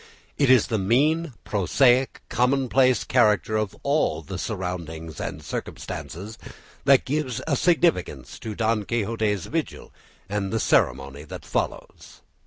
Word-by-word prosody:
It 140 -3 +3
is 130 -3 +6
the 110 - -1
mean, 145 - +2
prosaic, 125 +6 +2
commonplace 130 0 +2
character 105 0 +2
of 110 -3 -1
all 140 - +1
the 95 +3 -6
surroundings 85 - -5
and - - -5
circumstances 100 +7 -6 0.5
that 135 -1 +5
gives 130 -4 -2
a 150 - +1
significance 125 - +1
to 110 -2 -6
Don 110 -1 0
Quixote's 110 -3 -1
vigil 165 0 -4 0.3
and 100 -1 -2
the 115 - 0
ceremony 70 - +1
that - - -9
follows. - - -4
110 Hz, 125 wpm, -24 LUFS, 95-130 Hz, 0.5 s, is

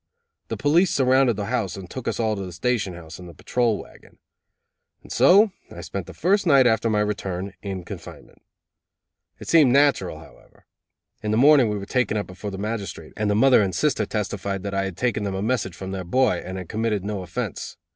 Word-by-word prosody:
The - - -4
police 165 +6 +3
surrounded 130 -2 +3
the 100 0 -3
house 105 -6 -2
and 95 -2 -8
took 130 +5 -7
us - - -2
all 110 -2 +1
to 100 - -5
the 90 - -7
station 95 0 -1
house 85 -1 -10
in 90 - -10
the 85 - -12
patrol 120 +2 0
wagon. - - -14 0.9
And - - -13
so 195 - +5 0.2
I - - -9
spent - - -6
the - - -9
first 195 +1 +1
night 140 -4 +6
after 115 -1 +2
my 105 -1 +2
return 100 -2 -3
in 95 -3 -5
confinement. - - -11 1.0
It - - -11
seemed 155 -6 +5
natural, 140 +2 +3
however. - - -18 0.6
In 105 - -3
the 110 - +1
morning 135 -2 +6
we 105 - -2
were 100 - -6
taken 110 -1 0
before 95 +3 -7
the 95 - -6
magistrate, 100 -6 -5
and 105 0 -1
the 105 - +2
mother 125 +2 +5
and 95 -3 -1
sister 125 - +1
testified 100 -2 -3
that 100 -1 -4
I 95 0 0
had 95 -3 -6
taken 120 -3 0
them 100 -2 -2
a 95 - -3
message 105 -6 -1
from 95 0 -7
their 95 -1 -4
boy, 110 0 +1
and 95 +1 -6
had 90 -2 -7
committed 110 -2 -2
no 105 -2 -3
offense. 90 -2 -5
105 Hz, 210 wpm, -23 LUFS, 95-125 Hz, 1.0 s, night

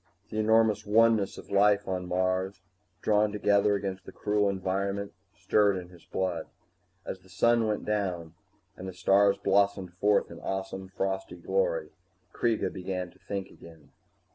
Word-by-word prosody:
The 110 - -2
enormous 110 -1 +3
oneness 110 -1 +3
of - - -11
life 100 0 +4
on 90 -1 -3
Mars, 95 +1 -1 0.4
drawn 105 0 +3
together 100 0 +3
against 95 -1 -4
the - - -10
cruel 105 -1 +1
environment, 100 +1 -2 0.2
stirred 100 -2 +2
in 90 -1 -7
his 90 -2 -17
blood. 90 -4 -2 0.6
As 95 - -5
the 95 - -22
sun 115 +5 +3
went 105 -1 -2
down 90 -6 -2 0.4
and 95 - -8
the 95 - -6
stars 100 +3 +4
blossomed 100 -2 +1
forth 100 +3 +2
in - - -9
awesome 95 0 -4
frosty 95 0 -3
glory, - - -1 0.4
Kreega 115 -3 0
began 90 -1 -4
to - - -24
think 100 -1 -5
again. 80 -3 -16
100 Hz, 150 wpm, -28 LUFS, 95-105 Hz, 0.6 s, life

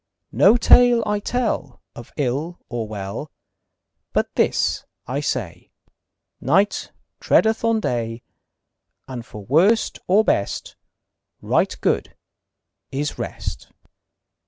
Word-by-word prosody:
No 240 - +5
tale 245 0 +6
I 210 0 0
tell 245 +2 -2 0.2
Of 120 - -11
ill 145 +5 -2
or 120 -2 -3
well, 100 -2 -6 0.8
But - - 0
this - - +1 0.2
I 130 +3 -2
say: 130 - -4 0.7
Night 195 +10 +1 0.3
treadeth 220 +1 +3
on 230 -1 +2
day, 115 - -2 0.8
And 125 -3 -6
for 105 -3 -11
worst 185 - +3
or 200 +4 +5
best 100 - -1 0.6
Right - - +1
good - - 0 0.8
is 145 +2 -3
rest. - - -5
145 Hz, 105 wpm, -22 LUFS, -, 0.8 s, tale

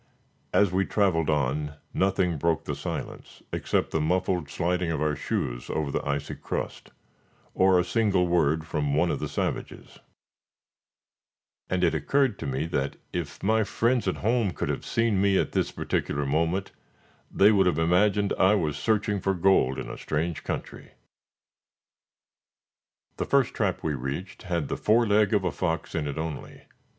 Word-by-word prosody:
As 100 -3 +3
we 95 +1 +2
traveled 90 -6 +1
on, 75 0 0 0.2
nothing 95 -3 +1
broke 80 +1 +1
the 75 - -3
silence, 70 0 -6
except - - 0
the 80 - 0
muffled 90 -1 0
sliding 90 +2 -1
of 80 -3 -1
our 75 -1 0
shoes - - -3
over 75 -3 -1
the - - -2
icy 70 0 -2
crust, - - -5 0.6
or 95 0 +4
a 90 - +3
single 100 -3 +2
word 80 -2 +1
from 75 -3 -1
one 85 +3 +2
of - - -2
the 75 - -3
savages; 70 - -4 1.7
and 90 0 0
it 85 - +3
occurred 115 - +1
to - - -4
me 65 +3 -1
that 70 -4 -2 0.2
if 80 -5 -5
my 110 +2 +3
friends 115 +2 0
at 95 - +1
home 115 -5 +2
could - - -3
have - - -2
seen 115 -4 +1
me 100 -1 +3
at - - 0
this - - 0
particular 70 0 -2
moment, 85 +7 0 0.6
they 100 +2 +5
would 95 -3 +4
have 90 - +1
imagined 100 +5 +2
I 95 +3 +5
was 75 -7 -1
searching 105 +2 0
for 95 +1 0
gold 85 -8 +3
in - - -5
a - - -7
strange 80 +2 -2
country. - - -6 2.2
The - - -1
first - - +2
trap - - -1
we 80 - 0
reached 70 +8 -5
had 85 -5 -2
the - - -3
fore 115 +2 +3
leg 105 -1 +3
of 105 -3 +2
a 90 - 0
fox 80 +2 -2
in 75 -3 -1
it 70 - -4
only. 80 -2 -6
85 Hz, 165 wpm, -26 LUFS, 75-100 Hz, 2.2 s, they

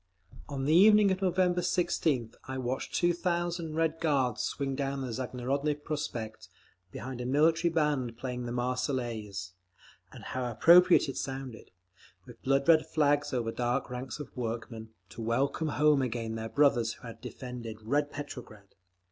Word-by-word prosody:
On 135 -2 -3
the 150 - +3
evening 210 +2 +7
of 190 +1 -1
November 180 -1 +2
16th 155 -10 0
I 130 0 -5
watched 130 +1 -3
two 175 0 +3
thousand 175 -2 -2
Red 165 0 0
Guards 135 -7 +1
swing 135 -1 -2
down 135 0 -2
the 125 -3 -4
Zagorodny 130 +4 -1
Prospekt 120 -9 -5 0.4
behind 130 -1 -6
a - - -4
military 160 +5 +3
band 145 -7 0
playing 125 -1 -4
the - - -4
Marseillaise—and 115 -8 -5
how 125 -1 -3
appropriate 175 +9 +6
it 135 - -5
sounded—with 110 -5 -9
blood 135 +2 +1
red 160 -2 +5
flags 145 -2 +2
over 120 -4 -1
the - - -16
dark 120 0 -1
ranks 125 +2 -5
of 145 - -9
workmen, 115 -2 -5 0.2
to 110 - -9
welcome 135 +7 0
home 150 -1 +3
again 115 -3 -2
their 110 0 -4
brothers 120 -6 +3
who - - -19
had 115 -1 -9
defended 115 -4 -7
"Red 145 +6 +1
Petrograd." 115 -9 -9
130 Hz, 150 wpm, -30 LUFS, 115-150 Hz, 0.4 s, evening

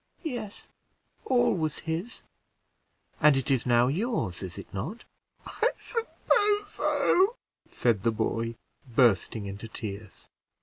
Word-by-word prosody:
"Yes, 240 - -5 0.6
all 250 -2 +3
was 155 -5 -1
his." 165 +8 -4 1.0
"And 150 -2 +6
it 135 0 0
is 130 -2 +1
now 120 0 +5
yours, 160 - -1
is 95 -2 -6
it - - -10
not?" 160 - -5 0.4
"I 470 - +1
suppose 415 -3 +1
so," 400 +1 +2 0.3
said 115 -5 +1
the 115 - +2
boy, 115 +1 -1 0.4
bursting 110 -3 +3
into 100 +3 -6
tears. 105 -2 -7
135 Hz, 120 wpm, -28 LUFS, -, 1.0 s, And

